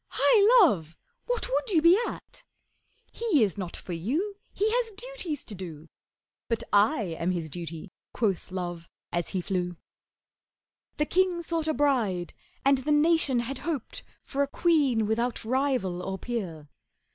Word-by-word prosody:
Hi, 450 -1 +6
Love, 165 - -3 0.3
what - - -1
would - - -1
you 355 -6 +4
be 335 +3 +7
at? - - -9 0.7
He 405 - +2
is 200 -5 0
not 185 -4 -5
for 180 - -6
you, 295 - -2 0.2
He 415 - 0
has 475 -1 +1
duties 405 - -5
to 215 - -8
do.' 165 -5 -8 0.6
'But 230 0 -1
I 205 - +3
am 170 - 0
his 170 -4 -2
duty,' 170 +2 -6 0.2
quoth 200 -6 -1
Love 175 -2 -5 0.2
as 175 0 -1
he 185 - -2
flew. 180 -1 -2 1.2
The 300 - +2
king 360 0 +1
sought 330 -1 -2
a 315 - +2
bride, 235 -11 +1 0.3
and 275 -1 +5
the 290 +3 -2
nation 295 -4 +4
had 255 +3 -5
hoped 310 -8 -4 0.2
For 280 - -2
a 280 - +2
queen 280 -8 +2
without 235 +2 -1
rival 250 -8 0
or 190 +1 -4
peer. 185 -11 -5
245 Hz, 155 wpm, -27 LUFS, -, 1.2 s, be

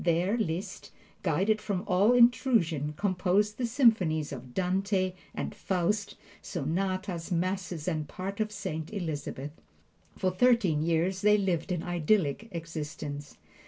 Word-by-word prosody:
There 175 +5 +2
Liszt, 180 -5 -3 0.3
guarded 215 +2 +1
from 200 -3 -2
all 200 +6 +4
intrusion, 220 - +3
composed 200 +2 +1
the 245 - +1
symphonies 215 - +3
of 125 -2 -8
"Dante" 185 0 +1 0.2
and - - -3
"Faust," 200 +3 -1 0.3
sonatas, 185 +2 -2
masses 180 -2 -2
and 155 -4 -1
parts 195 +6 -4
of 215 0 -1
"Saint 185 -6 -5
Elizabeth." 150 -7 -4 0.7
For 185 -1 +1
thirteen 190 -6 +3
years 170 +4 +1
they 210 0 +5
lived 190 -2 -1
an 175 -2 -1
idyllic 175 +1 +1
existence. 150 -4 -6
185 Hz, 125 wpm, -29 LUFS, 160-205 Hz, 0.7 s, they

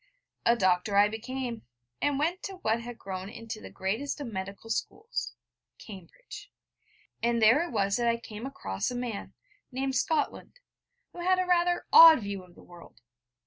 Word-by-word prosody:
A 235 - +6
doctor 190 -1 +1
I 205 +1 +7
became, 240 +2 -5 0.4
and 290 -1 +1
went 335 +6 -1
to 390 - -5
what 225 +2 +1
had 240 0 -8
grown 190 0 -6
into 225 0 -8
the - - -9
greatest 220 +11 -3
of 285 - -5
medical 195 +3 -6
schools 445 - -4 0.4
Cambridge; 200 - -12 0.7
and 235 0 +1
there 230 +7 +6
it 340 -1 -4
was 200 -2 +1
that 240 -1 0
I 235 0 +2
came 230 +1 -8
across 95 - -3
a 250 - -5
man, 245 -4 -5 0.4
named 265 +1 -2
Scotland, 310 - -1 0.5
who - - -10
had 370 +1 +2
a 370 - +1
rather 350 0 +2
odd 325 -5 +10
view 200 -2 -5
of 180 -1 -19
the - - -16
world. 175 -1 -15
235 Hz, 170 wpm, -28 LUFS, 200-290 Hz, 0.7 s, odd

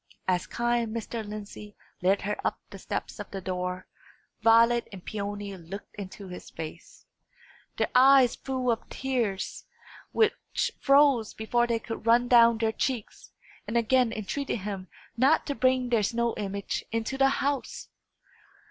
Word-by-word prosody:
As 180 -1 +1
kind 240 -1 -1
Mr. 230 0 -4
Lindsey 210 0 -8 0.3
led 190 +2 +2
her 205 +1 -1
up - - -1
the - - -9
steps - - -5
of - - -6
the 195 - -5
door, 180 -1 -3 0.6
Violet 230 +2 +5
and 190 -3 -10
Peony 205 -1 -4
looked 185 +3 -9
into 200 0 -8
his 180 -1 -9
face 160 +1 -9 0.7
their - - 0
eyes 260 -1 +6
full 255 -2 -1
of 230 - -3
tears, 240 -8 -2 0.5
which 440 -1 0
froze 275 -5 +4
before 240 +2 +1
they 235 -1 +1
could 225 0 -7
run 240 +2 +5
down 235 -2 +6
their 220 0 +1
cheeks 240 -1 -3 0.4
and 225 +3 0
again 240 +1 +3
entreated 230 +2 -3
him 195 -2 -5 0.3
not 270 +6 +4
to 285 - -2
bring 255 -2 +2
their 230 -3 +3
snow 235 +3 0
image 200 -1 -3
into 230 +3 -2
the 270 0 +4
house. 280 0 -2
230 Hz, 150 wpm, -28 LUFS, 200-250 Hz, 0.7 s, eyes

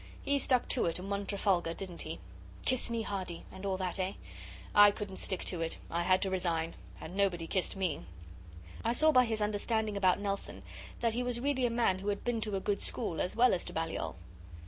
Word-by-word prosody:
He 280 0 +2
stuck 255 -2 +3
to 255 - +3
it 165 - 0
and 190 +2 -6
won 200 0 -2
Trafalgar, 185 -5 +1
didn't 185 -3 -5
he? - - -5 0.5
"Kiss 255 -2 +2
me, 230 -1 -1
Hardy" 185 -5 -4
and 190 +1 -6
all 190 -1 0
that, 185 0 -2
eh? 185 +1 -1 0.6
I 205 0 +9
couldn't 200 -2 -5
stick 190 - 0
to 175 -3 -2
it 165 0 -1
I 170 - 0
had 185 +2 +3
to 190 - -1
resign. 170 -3 0 0.3
And 175 - -8
nobody 190 -4 +1
kissed 185 +3 -1
me.' 190 -2 -1 0.8
I 230 - +2
saw 310 +5 +5
by 255 -3 +6
his 220 -2 -2
understanding 210 +1 0
about 190 -2 +3
Nelson 200 -1 -3 0.4
that 230 -2 +2
he 245 - 0
was 245 -1 -1
really 260 -1 +1
a - - -1
man 230 -5 +2
who 195 - -6
had 200 -1 -1
been 240 -2 0
to 210 -2 0
a - - 0
good 200 +1 -1
school 195 -9 -1
as 180 - -1
well 245 +1 +5
as 180 - 0
to - - -7
Balliol. 160 - -2
200 Hz, 220 wpm, -32 LUFS, 185-230 Hz, 0.8 s, I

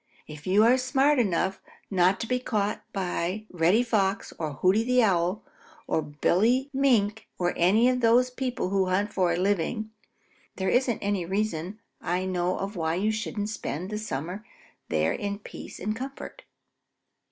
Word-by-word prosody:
If 150 +1 -10
you 200 +3 +5
are 245 +3 +5
smart 270 +2 +3
enough 190 -3 0 0.3
not 185 0 +3
to 230 - -3
be 250 +1 0
caught 210 -4 -1
by 185 +1 -2
Reddy 180 +7 +3
Fox 205 -4 0
or 155 -3 -3
Hooty 185 +10 +2
the 250 0 +3
Owl 185 +1 +1 0.4
or 160 - 0
Billy 210 - +1
Mink 220 -6 +2
or 175 -1 0
any 205 +8 +4
of 255 0 +2
those 245 +2 +4
people 250 -6 -2
who 195 -1 +1
hunt 200 +3 0
for 180 -3 +2
a - - -1
living, 205 +4 0 0.6
there 190 0 -1
isn't 245 -3 +2
any 200 -2 0
reason 190 0 -2 0.2
I 180 +2 -1
know 180 -1 0
of 200 +2 -4
why 160 -1 -1
you 205 +4 +1
shouldn't 215 -1 -3
spend 185 -3 -4
the 210 - -2
summer 180 +1 -5 0.5
there 80 0 +1
in 200 -1 -3
peace 205 - -10
and 215 +1 -2
comfort." 270 +3 -8
200 Hz, 165 wpm, -27 LUFS, 180-225 Hz, 0.6 s, you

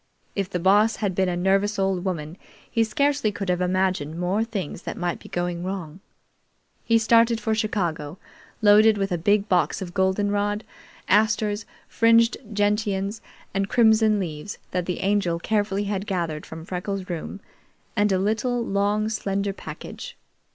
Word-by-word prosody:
If 195 -2 -1
the 180 - -2
Boss 205 +5 +4
had 200 -3 -2
been 190 0 +1
a 175 - -1
nervous 195 +3 +1
old 190 -2 0
woman, 165 -4 -3 0.3
he 230 -2 +1
scarcely 275 +1 +1
could 195 -2 -5
have 180 0 +1
imagined 180 -4 0
more 185 +5 +1
things 200 -8 -5
that - - -6
might 175 -1 -2
be - - -13
going 175 -1 -2
wrong. 180 -3 -5 0.8
He 230 - +3
started 230 +1 +4
for 220 0 -1
Chicago, 180 -8 -2 0.5
loaded 210 +1 +6
with 195 -1 -1
a 175 - +1
big 205 +4 +2
box 180 -3 +1
of 175 -2 -6
goldenrod, 205 +2 0 0.4
asters, 215 +1 +2 0.2
fringed 230 0 +4 0.2
gentians, 205 0 0 0.3
and 195 +1 -1
crimson 220 -2 +4
leaves, 165 +1 -5
that 180 -1 -2
the 180 - -2
Angel 195 -4 +1
carefully 205 +2 0
had 200 0 -3
gathered 170 -5 -2
from 160 0 -9
Freckles' 185 +1 -4
room, 175 +2 -5 0.6
and 205 0 +2
a 190 - +3
little, 225 +5 0
long 205 +1 +1
slender 200 -2 -2
package. 485 - -9
200 Hz, 155 wpm, -24 LUFS, 180-215 Hz, 0.8 s, loaded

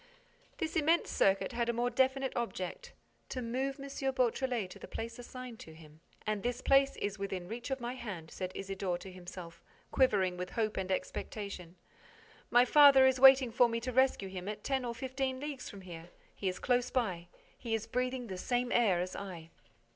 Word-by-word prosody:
This 325 -2 -3
immense 320 +1 +2
circuit 195 0 +2
had 235 -1 -1
a - - +2
more 240 +1 0
definite 265 +2 +1
object: 235 - -4 0.4
to 255 - -4
move 260 +3 -2
M. 275 - -7 0.3
Beautrelet 250 -3 0
to - - -11
the - - -9
place 230 +2 -6
assigned 250 -1 -8
to 160 - -11
him. 155 -1 -15 0.3
"And 215 -1 -1
this 245 +2 -2
place 275 +1 +4
is 205 0 -3
within 190 -3 -4
reach 235 +6 -6
of 270 0 -2
my 240 0 -4
hand," 190 -11 -7
said 185 -1 -4
Isidore 195 -2 -3
to 190 +2 -10
himself, 175 -2 -10 0.3
quivering 190 -8 +2
with 180 0 -4
hope 215 -2 -1
and 190 0 -2
expectation. 185 -2 -4 0.7
"My 245 +1 +6
father 280 0 +8
is 260 -1 +3
waiting 265 -2 +8
for 245 +1 +4
me 230 0 -1
to 255 +2 -3
rescue 260 -5 +2
him 185 0 -6
at 210 0 -6
ten 265 -2 0
or 235 -1 -3
fifteen 260 +1 -3
leagues 285 -2 -5
from 200 - -10
here. 170 -2 -10 0.2
He 195 - -4
is 180 - -4
close 250 0 +1
by. 185 -9 -1 0.3
He 230 -2 -2
is 220 0 -3
breathing 250 +2 -2
the 190 -4 -6
same 245 +3 0
air 205 -7 +3
as 180 +1 -4
I." 175 -5 -7
235 Hz, 190 wpm, -32 LUFS, 190-260 Hz, 0.7 s, father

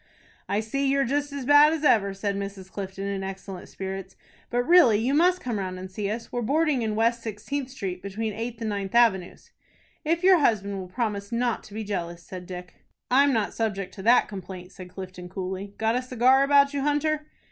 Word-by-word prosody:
"I 205 +2 +1
see 275 +6 -1
you're 275 0 +2
just 285 +3 -1
as 280 -2 -5
bad 290 +2 +7
as 320 -2 -3
ever," 205 -9 +4
said 200 0 -2
Mrs. 195 -1 -6
Clifton, 195 -1 -6
in 200 -1 -3
excellent 190 -1 -7
spirits. 190 0 -6 0.3
"But 245 0 +1
really 325 -8 +6
you 240 +6 0
must 360 +4 +3
come 235 -4 -2
round 185 -1 -4
and 185 0 -8
see 200 +1 -3
us. 230 +2 -5
We 245 - -2
are - - -2
boarding 290 +2 +1
in 220 -2 -1
West 230 +2 +1
Sixteenth 240 +5 -4
Street, 190 -8 -5
between 210 +3 -3
Eighth 230 +2 -5
and 225 - -1
Ninth 200 0 -4
Avenues." 205 -7 +2 0.5
"If 335 +2 0
your 370 -2 +7
husband 200 -7 +1
will 185 - -6
promise 205 0 -3
not 235 0 0
to 205 - -12
be 220 - -3
jealous," 175 -4 -4
said 180 0 -9
Dick. 180 -1 -9 0.3
"I'm 280 +2 +5
not 220 -5 0
subject 200 -4 -2
to 195 - -9
that 235 +5 +5
complaint," 185 -2 -8
said 185 -2 -11
Clifton, 180 -1 -9
coolly. 190 +2 -5
"Got 225 +1 +1
a 250 - +1
cigar 255 +1 +3
about 280 0 +4
you, 280 - -1
Hunter?" 295 +1 0
220 Hz, 210 wpm, -26 LUFS, 195-265 Hz, 0.5 s, bad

